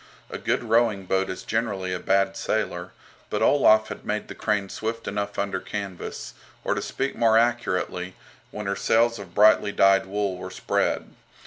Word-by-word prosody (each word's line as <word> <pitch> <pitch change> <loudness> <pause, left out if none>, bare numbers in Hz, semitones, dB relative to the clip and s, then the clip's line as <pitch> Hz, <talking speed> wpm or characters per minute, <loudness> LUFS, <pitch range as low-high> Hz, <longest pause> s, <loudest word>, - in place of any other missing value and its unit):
A - - -5
good - - 0
rowing 115 -4 +2
boat 95 +1 0
is 95 - -5
generally 100 -5 -2
a 90 - -3
bad 95 +1 +1
sailer, - - -2 0.4
but - - -1
Olaf 110 -6 +5
had - - -7
made 105 0 -3
the - - -6
"Crane" 105 -2 -1
swift 115 +4 -5
enough 100 0 -3
under 100 -2 -1
canvas, 100 -2 -6 0.3
or - - +1
to - - -2
speak 135 0 -3
more 115 -1 +4
accurately, 95 -6 0 0.3
when 105 - -6
her 100 0 -1
sails 115 +3 +2
of 95 -3 -11
brightly 105 0 +5
dyed 95 -1 +4
wool 100 -1 -2
were 95 - -6
spread. 90 - -1
100 Hz, 175 wpm, -25 LUFS, 95-110 Hz, 0.4 s, Olaf